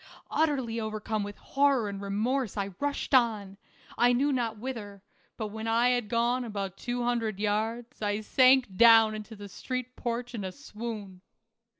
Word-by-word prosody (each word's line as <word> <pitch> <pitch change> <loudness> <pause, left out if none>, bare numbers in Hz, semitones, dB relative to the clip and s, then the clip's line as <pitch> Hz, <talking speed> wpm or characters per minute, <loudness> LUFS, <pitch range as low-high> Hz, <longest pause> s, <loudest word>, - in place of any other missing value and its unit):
Utterly 265 -7 0
overcome 215 0 -3
with 205 0 -6
horror 275 -5 +2
and 200 -1 -5
remorse 215 +4 -1
I 200 -1 -2
rushed 285 0 -2
on, 215 -6 +2 0.4
I 245 +1 +5
knew 280 +4 +2
not 230 -4 -1
whither, 210 -5 -7 0.3
but 215 -2 -3
when 220 +2 -6
I 230 +2 +3
had 245 -4 0
gone 240 +2 +1
about 200 -4 -4
two 245 +3 -3
hundred 230 -4 -1
yards, 220 +4 -2
I 205 0 -1
sank 255 -2 +4
down 225 0 +7
on 215 0 -5
the 205 -3 -9
street 255 +5 -5
porch 240 +1 -4
in 220 -4 -4
a 190 - -4
swoon. 210 -2 -7
225 Hz, 165 wpm, -29 LUFS, 205-245 Hz, 0.4 s, down